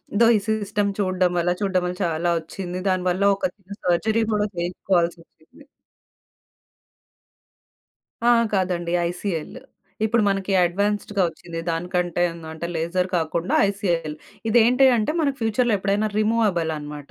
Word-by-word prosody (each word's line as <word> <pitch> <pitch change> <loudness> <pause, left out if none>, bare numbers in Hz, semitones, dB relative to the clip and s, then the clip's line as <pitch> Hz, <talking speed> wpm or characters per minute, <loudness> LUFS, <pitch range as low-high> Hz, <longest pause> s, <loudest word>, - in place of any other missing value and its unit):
ఇదో 230 +3 +5
ఈ - - 0
సిస్టమ్ 205 -1 0
చూడడం 185 -2 +1
వల్ల 175 +1 +1
చూడ్డం 190 -3 +1
వల్ల 180 0 -3
చాలా 165 +1 0
ఒచ్చింది. 180 +2 -6
దాని 185 -1 0
వల్ల 185 +2 0
ఒక 200 - -3
చిన్న 200 -1 -12
సర్జరీ 215 +6 +2
గూడా 210 0 +1
చేయించుకోవాల్సొచ్చింది. 175 - -3 2.7
ఆ! - - +7 0.2
కాదండి 180 -3 0 0.2
ఐసీఎల్లు, 175 -3 -4 0.4
ఇప్పుడు 225 0 +2
మనకి 195 0 0
అడ్వాన్స్డ్‌గా 205 +2 0
వచ్చింది 165 0 -8
దానికంటే 175 +1 -1 0.3
అంటే 160 +2 -5
లేజర్ 170 +3 0
కాకుండా 165 +2 -2
ఐసీఎల్ 175 -6 -1 0.3
ఇది 220 - +3
ఏంటి 250 +3 +4
అంటే 215 +7 0
మన 295 - +2
ఫ్యూచర్‌లో 225 +1 +1
ఎప్పుడైనా 200 +2 0
రిమూవబుల్ 215 -7 +1
అన్నమాట. 150 -1 -8
185 Hz, 125 wpm, -23 LUFS, 170-205 Hz, 2.7 s, ఆ